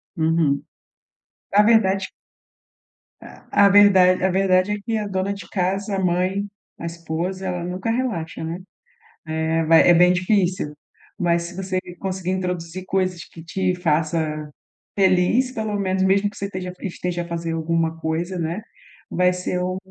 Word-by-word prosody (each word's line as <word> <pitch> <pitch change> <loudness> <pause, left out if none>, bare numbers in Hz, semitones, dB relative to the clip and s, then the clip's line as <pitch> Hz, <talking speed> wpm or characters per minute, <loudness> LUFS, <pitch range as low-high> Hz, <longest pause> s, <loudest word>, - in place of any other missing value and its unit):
Uhum. 160 -4 +1 0.9
Na 205 +1 +6
verdade 195 -4 +3 1.1
a, 200 - 0
a 200 - +7
verda 195 -2 +7
a - - +3
verdade 185 +1 +2
é 210 - -2
que 225 0 -2
a 210 -1 -3
dona 190 +1 -1
de 190 -4 -10
casa, 195 +2 -1
a - - -1
mãe, 185 +3 0 0.3
a 170 - -6
esposa, 170 +3 -4
ela 180 -1 -3
nunca 180 +4 -3
relaxa, 225 -11 -2
né, 165 +3 -4 0.7
eh, 160 +1 0
vai 165 +2 +6
é 175 - +8
bem 180 +1 +6
difícil, 180 -4 0 0.4
mas 170 -1 +1
se 175 +1 -8
você 185 -1 -2 0.2
conseguir 185 -1 -3
introduzir 180 -1 -3
coisas 185 -2 -1
que 165 - -13
te 185 +1 -1
faça 155 -2 -1 0.5
feliz, 195 +7 +3
pelo 220 -4 -3
menos 190 -1 0
mesmo 195 +2 +3
que 205 - -17
você 200 - -3
esteja 185 -2 -5
esteja 180 -2 -3
a - - -10
fazer 170 -1 -3
alguma 165 0 -1
coisa, 170 +3 -2
né, 170 +5 -2 0.5
vai 180 0 +2
ser 180 0 -2
o 185 0 -2
180 Hz, 155 wpm, -22 LUFS, 170-195 Hz, 1.1 s, é